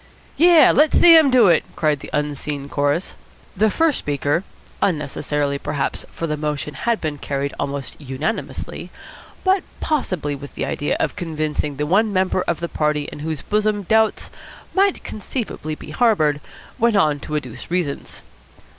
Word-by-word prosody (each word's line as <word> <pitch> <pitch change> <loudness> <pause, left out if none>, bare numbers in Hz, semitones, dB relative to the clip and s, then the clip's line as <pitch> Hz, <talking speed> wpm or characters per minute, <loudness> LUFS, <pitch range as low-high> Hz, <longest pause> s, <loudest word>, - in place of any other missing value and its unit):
"Yes, 335 -3 +6
let 300 +1 +4
Sam 325 -4 +8
do 250 -3 +6
it!" 170 -3 +4
cried 150 -3 +1
the - - -9
unseen 145 -1 -3
chorus. 145 +6 0 0.4
The 215 +3 +3
first 320 +6 +2
speaker, 145 +4 -1 0.4
unnecessarily, 145 -3 -1
perhaps 145 -2 -3
for 165 - -4
the 150 -2 -1
motion 150 0 -3
had 235 +5 -1
been 150 -3 -4
carried 140 0 -3
almost 140 +1 -4
unanimously 145 - -4 0.5
but 380 0 +3 0.2
possibly 185 - -1
with 140 0 -9
the - - -2
idea 145 - -1
of - - -1
convincing 155 -5 -2
the 150 +2 -2
one 205 +7 +2
member 185 -1 +1
of 170 -1 -1
the 170 - -1
party 150 -2 0
in - - -9
whose 155 0 -4
bosom 210 -1 0
doubts 220 +3 +2 0.4
might 395 0 +2
conceivably 210 - -5
be - - -10
harboured, 155 -12 +2 0.4
went 235 -1 +3
on 155 -7 +3
to 150 - -5
adduce 130 -3 -5
reasons. 170 -5 -3
155 Hz, 155 wpm, -21 LUFS, 145-215 Hz, 0.5 s, Sam